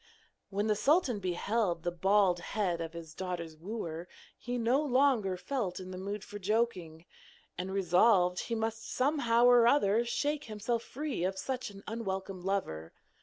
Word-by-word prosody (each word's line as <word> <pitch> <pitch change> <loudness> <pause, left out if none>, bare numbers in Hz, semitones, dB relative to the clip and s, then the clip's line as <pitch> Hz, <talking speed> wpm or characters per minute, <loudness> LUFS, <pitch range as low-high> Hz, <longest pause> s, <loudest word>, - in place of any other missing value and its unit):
When 205 +1 -1
the 215 -1 +2
sultan 275 - +2
beheld 185 -1 -1
the 175 - 0
bald 190 0 +3
head 175 -2 -1
of 165 0 -5
his 165 -2 -9
daughter's 170 -3 -5
wooer, 170 -2 -5 0.3
he 245 +1 -4
no 245 +4 +2
longer 255 -9 +2
felt 210 -3 -3
in 185 0 -8
the 185 - -6
mood 200 +2 -4
for 205 0 -8
joking, 185 -6 -1 0.5
and 185 +2 -4
resolved 180 0 +3
that - - -2
he 230 - -2
must 225 0 -3
somehow 255 -4 +2
or 245 -1 +7
other 230 -4 +4
shake 290 +5 -1
himself 225 +2 -2
free 285 - -4
of 190 +1 -1
such 255 +4 -3
an 200 -1 -12
unwelcome 195 -4 -4
lover. 130 - -2
205 Hz, 165 wpm, -31 LUFS, 180-235 Hz, 0.5 s, or